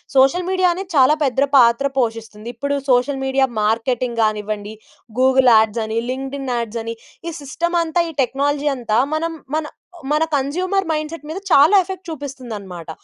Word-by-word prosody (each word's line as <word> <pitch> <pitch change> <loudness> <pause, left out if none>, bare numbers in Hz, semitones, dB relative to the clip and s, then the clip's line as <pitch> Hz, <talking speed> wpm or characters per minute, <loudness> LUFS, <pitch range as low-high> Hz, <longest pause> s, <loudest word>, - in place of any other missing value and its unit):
Social 270 +7 +4
media 370 -1 +2
అనేది 380 +2 -7
చాలా 265 +1 +6
పెద్ద 265 -1 +1
పాత్ర 240 +2 +5
పోషిస్తుంది. 225 -3 -3
ఇప్పుడు 280 +4 -2
సోషల్ 255 +2 +2
మీడియా 265 0 +2 0.2
మార్కెటింగ్ 235 +2 0
గానివ్వండి, 210 -1 -2 0.5
గూగుల్ 260 0 +5
యాడ్స్ 220 +1 +3
అని, 220 +1 -3
లింక్డ్ఇన్ 270 +1 -4
యాడ్స్ 235 -1 -3
అని, 230 0 -4 0.3
ఈ - - -2
సిస్టమ్ 340 +5 -2
అంతా, 330 +1 0
ఈ - - -6
టెక్నాలజీ 285 +3 0
అంతా 225 -4 -1 0.2
మనం 330 +1 -2 0.2
మన 315 0 -1 0.3
ఒ - - -15
మన 305 +1 +2
కన్స్యూమర్ 365 +8 -1
మైండ్ 305 0 -2
సెట్ 330 -3 -9
మీద 330 +5 -4
చాలా 300 +8 +6
ఎఫెక్ట్ 375 0 -8
చూపిస్తుందన్నమాట. 240 - -7
265 Hz, 160 wpm, -19 LUFS, 230-310 Hz, 0.5 s, చాలా